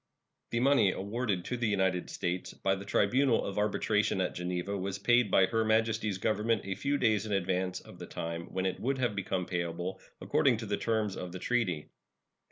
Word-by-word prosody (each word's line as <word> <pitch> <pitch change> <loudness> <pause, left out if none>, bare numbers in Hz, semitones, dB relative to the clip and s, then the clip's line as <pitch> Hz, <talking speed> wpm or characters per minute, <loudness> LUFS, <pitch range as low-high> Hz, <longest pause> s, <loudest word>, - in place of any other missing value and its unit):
The 115 - 0
money 135 -7 +5
awarded 100 -1 -2
to 125 - -2
the 120 -1 0
United 95 -3 +1
States 90 +1 -3
by 95 - +1
the 95 +1 -5
tribunal 120 +5 +2
of 100 +1 -3
arbitration 105 -1 +1
at 90 - 0
Geneva 90 +2 -3
was 95 0 -3
paid 120 +2 +3
by 95 - +5
Her 115 +3 0
Majesty's 110 -2 +1
Government 110 +2 +1
a 95 - -2
few 140 +9 0
days 110 -4 +2
in - - -5
advance 95 -1 0
of - - -14
the - - -7
time 85 0 -4
when 95 0 -2
it 95 - -1
would 135 +3 0
have 120 -5 0
become 95 -2 -1
payable 85 +1 -3 0.2
according 130 -4 +2
to 110 - -5
the 100 -1 0
terms 110 -3 0
of 90 -1 -6
the - - -4
treaty. 95 -9 -1
100 Hz, 195 wpm, -31 LUFS, 95-115 Hz, 0.2 s, money